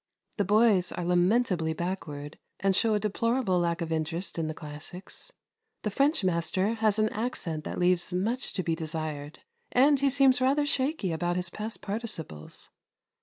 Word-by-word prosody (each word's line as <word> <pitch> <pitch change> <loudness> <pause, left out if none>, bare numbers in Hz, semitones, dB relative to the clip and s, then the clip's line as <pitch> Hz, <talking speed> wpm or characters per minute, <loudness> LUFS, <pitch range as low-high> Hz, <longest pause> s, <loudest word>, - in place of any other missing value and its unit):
The 205 - +1
boys 205 -3 +4
are 175 - -4
lamentably 180 -2 +2
backward 155 -4 -5 0.2
and 195 0 +2
show 220 +2 +3
a - - +2
deplorable 215 -1 +1
lack 170 0 0
of 165 -1 -3
interest 165 +3 -2
in 160 - -1
the 155 - -4
classics. 155 - -7 0.5
The 210 - -1
French 275 +3 +2
master 185 +4 +1
has 220 -2 +2
an 215 0 +3
accent 180 -10 -3
that - - -4
leaves 180 0 +2
much 220 +8 -1
to 185 - -1
be 165 - 0
desired, 155 -2 -5 0.3
and 275 +3 +5
he 280 0 +3
seems 265 -2 +4
rather 280 +3 +3
shaky 275 - 0
about 175 +2 -1
his 180 -1 0
past 215 +1 -6
participles. 195 - -5
185 Hz, 165 wpm, -28 LUFS, 165-230 Hz, 0.5 s, and